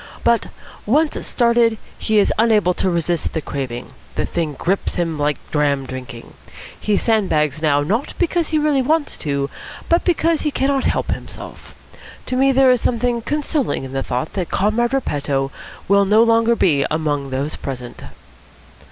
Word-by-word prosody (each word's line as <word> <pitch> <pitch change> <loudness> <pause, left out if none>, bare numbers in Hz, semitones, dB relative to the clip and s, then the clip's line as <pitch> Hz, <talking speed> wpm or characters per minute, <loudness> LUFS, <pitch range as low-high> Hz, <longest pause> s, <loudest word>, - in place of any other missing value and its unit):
But, 235 -2 +2 0.4
once 300 +7 +2
started, 235 -2 +3 0.2
he 215 - +1
is 205 - +3
unable 215 -5 +3
to 185 - 0
resist 170 -1 -1
the 160 - -1
craving. 130 -5 -5 0.2
The - - 0
thing 165 -3 -2
grips 190 +8 -1
him 165 -3 -2
like 145 0 +1
dram 145 -2 +1
drinking. 125 -2 -8 0.5
He 210 -1 +1
sandbags 160 - +1
now 145 -2 +3
not 220 - -1
because 345 -2 +1
he 315 - +1
really 300 -3 +2
wants 305 +3 0
to, 140 -3 -1 0.4
but 335 +1 +3
because 335 -2 +1
he 300 - 0
cannot 275 -1 0
help - - 0
himself. - - -8 0.5
To 255 - -3
me 270 +1 +4
there 265 -1 +5
is 250 -2 +2
something 240 0 0
consoling 295 - -1
in 135 - -7
the 135 - -1
thought 125 +3 -3
that 185 -4 -3
Comrade 220 +5 +1
Repetto 140 - -1 0.4
will 200 0 +4
no 215 +3 +5
longer 230 0 +3
be 145 -10 +3
among 145 -3 -1
those 135 +3 -2
present." 125 -3 -7
200 Hz, 160 wpm, -20 LUFS, -, 0.5 s, there